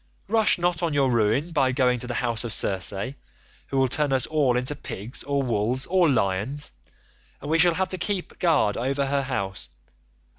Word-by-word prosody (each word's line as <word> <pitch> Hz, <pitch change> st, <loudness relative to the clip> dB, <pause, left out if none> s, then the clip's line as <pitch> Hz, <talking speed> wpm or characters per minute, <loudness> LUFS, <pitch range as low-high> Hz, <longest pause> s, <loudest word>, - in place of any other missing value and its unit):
Rush 220 Hz, +1 st, +3 dB
not 175 Hz, -1 st, 0 dB
on 165 Hz, -4 st, -1 dB
your 135 Hz, -2 st, +2 dB
ruin 115 Hz, +8 st, +1 dB
by 135 Hz, -5 st, +2 dB
going 125 Hz, -1 st, +1 dB
to 125 Hz, -, -5 dB
the 120 Hz, -, -4 dB
house 115 Hz, 0 st, -1 dB
of 120 Hz, -, -4 dB
Circe, 95 Hz, -3 st, +3 dB, 0.8 s
who 135 Hz, -, -3 dB
will 135 Hz, 0 st, +3 dB
turn 145 Hz, +3 st, +1 dB
us 130 Hz, -2 st, +1 dB
all 140 Hz, -6 st, +1 dB
into 125 Hz, +3 st, -2 dB
pigs 115 Hz, -4 st, -7 dB
or 140 Hz, 0 st, -1 dB
wolves 120 Hz, +2 st, +1 dB
or 180 Hz, -3 st, +3 dB
lions, 120 Hz, +4 st, -1 dB, 0.7 s
and 145 Hz, -, -6 dB
we 165 Hz, -, +3 dB
shall 175 Hz, 0 st, +4 dB
have 190 Hz, +1 st, -1 dB
to 185 Hz, -, -5 dB
keep 190 Hz, 0 st, -3 dB
guard 150 Hz, -, +2 dB
over 135 Hz, +3 st, -1 dB
her 140 Hz, +1 st, 0 dB
house. 100 Hz, -8 st, -4 dB
135 Hz, 190 wpm, -24 LUFS, 120-160 Hz, 0.8 s, shall